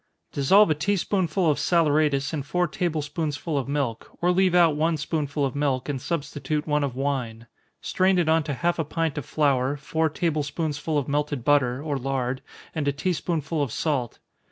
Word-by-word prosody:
_ -, -, -41 dB
Dissolve 170 Hz, +7 st, +5 dB
a -, -, +6 dB
tea 180 Hz, +7 st, 0 dB
spoonful 185 Hz, -2 st, 0 dB
of 145 Hz, -, -1 dB
saleratus 150 Hz, -4 st, +2 dB
in 150 Hz, -, -1 dB
four 175 Hz, +6 st, 0 dB
table 160 Hz, -2 st, -2 dB
spoonsful 150 Hz, +1 st, -3 dB
of 135 Hz, -2 st, -1 dB
milk, 140 Hz, -5 st, -2 dB
or 175 Hz, +1 st, +2 dB
leave 185 Hz, 0 st, +3 dB
out 170 Hz, -4 st, +5 dB
one 160 Hz, +2 st, +1 dB
spoonful 145 Hz, -1 st, -1 dB
of 135 Hz, -, -2 dB
milk, 140 Hz, -2 st, -1 dB
and 135 Hz, -3 st, -2 dB
substitute 150 Hz, -1 st, -3 dB
one 150 Hz, -1 st, +1 dB
of 135 Hz, -3 st, -2 dB
wine. 125 Hz, -5 st, -2 dB, 0.4 s
Strain 185 Hz, 0 st, +2 dB
it 175 Hz, -3 st, +2 dB
on 160 Hz, +1 st, +4 dB
to 145 Hz, -3 st, -2 dB
half 170 Hz, +5 st, 0 dB
a -, -, +2 dB
pint 160 Hz, -1 st, -2 dB
of 140 Hz, -, -9 dB
flour, 140 Hz, -2 st, +1 dB
four 160 Hz, +3 st, 0 dB
table 155 Hz, 0 st, -1 dB
spoonsful 150 Hz, +1 st, -2 dB
of 140 Hz, -, -1 dB
melted 145 Hz, -3 st, -1 dB
butter, 140 Hz, -2 st, +2 dB
or 145 Hz, -3 st, -2 dB
lard, 130 Hz, -1 st, -2 dB, 0.3 s
and 150 Hz, -3 st, -2 dB
a -, -, +4 dB
tea 165 Hz, +6 st, -1 dB
spoonful 160 Hz, -2 st, -2 dB
of 140 Hz, -5 st, -1 dB
salt. 130 Hz, -6 st, -1 dB
150 Hz, 200 wpm, -25 LUFS, 140-165 Hz, 0.4 s, a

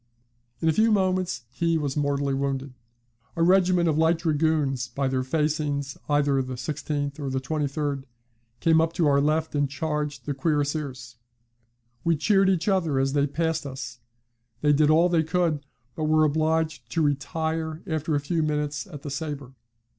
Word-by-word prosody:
In 165 Hz, -, +1 dB
a 160 Hz, -, +4 dB
few 220 Hz, +7 st, +3 dB
moments 185 Hz, -, +1 dB
he 165 Hz, +5 st, +1 dB
was 145 Hz, -3 st, -2 dB
mortally 140 Hz, -1 st, 0 dB
wounded. 135 Hz, -1 st, -2 dB, 0.6 s
A 165 Hz, -, +1 dB
regiment 180 Hz, -1 st, +4 dB
of 155 Hz, -1 st, +1 dB
light 160 Hz, +1 st, +4 dB
Dragoons, 150 Hz, -5 st, +1 dB
by 140 Hz, +1 st, -2 dB
their 130 Hz, 0 st, 0 dB
facings 145 Hz, 0 st, -1 dB
either 145 Hz, -2 st, +3 dB
the 130 Hz, 0 st, -5 dB
16th 145 Hz, +2 st, -3 dB
or 140 Hz, -2 st, -3 dB
23d, 140 Hz, +1 st, -2 dB, 0.6 s
came 160 Hz, -1 st, +5 dB
up 165 Hz, 0 st, 0 dB
to 170 Hz, -2 st, +1 dB
our 140 Hz, -1 st, +4 dB
left 155 Hz, +2 st, 0 dB
and 145 Hz, -2 st, +1 dB
charged 150 Hz, +1 st, -3 dB
the 145 Hz, -, -1 dB
cuirassiers. 140 Hz, -4 st, -2 dB, 0.9 s
We 170 Hz, -1 st, +3 dB
cheered 195 Hz, +4 st, +3 dB
each 180 Hz, -1 st, +1 dB
other 175 Hz, -8 st, +2 dB
as 135 Hz, 0 st, +1 dB
they 145 Hz, 0 st, +2 dB
passed 160 Hz, 0 st, -1 dB
us; 125 Hz, -3 st, -7 dB, 0.6 s
they 150 Hz, 0 st, +4 dB
did 150 Hz, +1 st, +4 dB
all 165 Hz, +3 st, +5 dB
they 170 Hz, -2 st, +3 dB
could, 160 Hz, -2 st, 0 dB, 0.3 s
but 155 Hz, -, -2 dB
were 155 Hz, 0 st, +4 dB
obliged 155 Hz, -4 st, 0 dB
to 160 Hz, -, +2 dB
retire 160 Hz, +2 st, -2 dB
after 160 Hz, -3 st, -1 dB
a -, -, +2 dB
few 160 Hz, +3 st, -1 dB
minutes 150 Hz, +1 st, -1 dB
at 145 Hz, -6 st, -10 dB
the 145 Hz, -, -5 dB
sabre. 140 Hz, -2 st, -5 dB
150 Hz, 165 wpm, -25 LUFS, 140-160 Hz, 0.9 s, came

